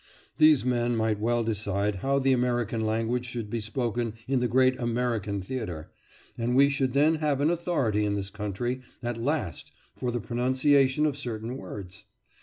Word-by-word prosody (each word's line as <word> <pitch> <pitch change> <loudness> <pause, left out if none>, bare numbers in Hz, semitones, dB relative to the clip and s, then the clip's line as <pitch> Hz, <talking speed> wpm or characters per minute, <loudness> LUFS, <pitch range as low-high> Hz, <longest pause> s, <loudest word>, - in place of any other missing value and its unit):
These 155 -5 +6
men 120 -1 +1
might 110 -2 0
well 120 +2 +1
decide 105 -2 -1
how 135 +8 0
the 135 -1 +3
American 120 -3 0
language 115 +3 0
should 115 -4 -5
be 115 - -1
spoken 115 0 -2
in 135 -1 +2
the 125 - +1
great 130 +2 +3
American 115 -5 -1
theatre, 95 -9 -5 0.5
and 120 +2 0
we 140 +1 +6
should 135 -2 0
then 150 +3 +4
have 150 -3 0
an 150 +3 +3
authority 150 - 0
in 105 -1 0
this 100 -1 -4
country 110 +5 -3 0.2
at 120 -1 -3
last 145 +1 -2 0.2
for 125 - -3
the 120 0 -1
pronunciation 130 +4 +2
of 150 -3 0
certain 120 -2 -4
words. 95 -1 -8
120 Hz, 170 wpm, -27 LUFS, 110-130 Hz, 0.5 s, These